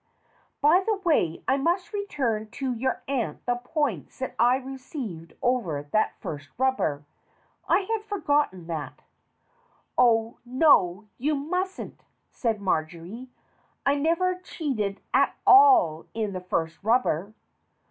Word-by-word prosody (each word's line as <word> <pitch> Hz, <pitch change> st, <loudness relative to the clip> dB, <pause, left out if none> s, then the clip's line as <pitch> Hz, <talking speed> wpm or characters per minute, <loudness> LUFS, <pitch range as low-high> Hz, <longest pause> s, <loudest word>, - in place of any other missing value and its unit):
By 330 Hz, +6 st, +5 dB
the 435 Hz, +2 st, +1 dB
way, 320 Hz, -, 0 dB
I 265 Hz, -, +3 dB
must 345 Hz, +8 st, 0 dB
return 250 Hz, -, -2 dB
to 265 Hz, -2 st, -2 dB
your 255 Hz, +3 st, -2 dB
aunt 240 Hz, -, -2 dB
the 245 Hz, 0 st, +1 dB
points 245 Hz, -, -3 dB
that 260 Hz, -, -4 dB
I 240 Hz, +2 st, +5 dB
received 260 Hz, -, -7 dB
over 215 Hz, -, 0 dB
that 180 Hz, +9 st, 0 dB
first 145 Hz, -1 st, -7 dB
rubber. 240 Hz, -, 0 dB, 0.6 s
I -, -, +4 dB
had 435 Hz, +2 st, -2 dB
forgotten 295 Hz, -, 0 dB
that." 160 Hz, -3 st, -6 dB, 1.0 s
"Oh, 230 Hz, -2 st, +3 dB
no, 240 Hz, -, +3 dB
you 295 Hz, +4 st, +1 dB
mustn't!" 360 Hz, +7 st, -3 dB, 0.3 s
said 225 Hz, -4 st, -1 dB
Marjory. 180 Hz, +6 st, -3 dB, 0.6 s
"I 280 Hz, -, +4 dB
never 335 Hz, +5 st, +1 dB
cheated 230 Hz, -, -3 dB
at -, -, +3 dB
all 390 Hz, -, +6 dB
in 215 Hz, -3 st, -2 dB
the 185 Hz, -, -4 dB
first 165 Hz, -2 st, -2 dB
rubber." 215 Hz, -4 st, +1 dB
250 Hz, 125 wpm, -26 LUFS, 190-300 Hz, 1.0 s, all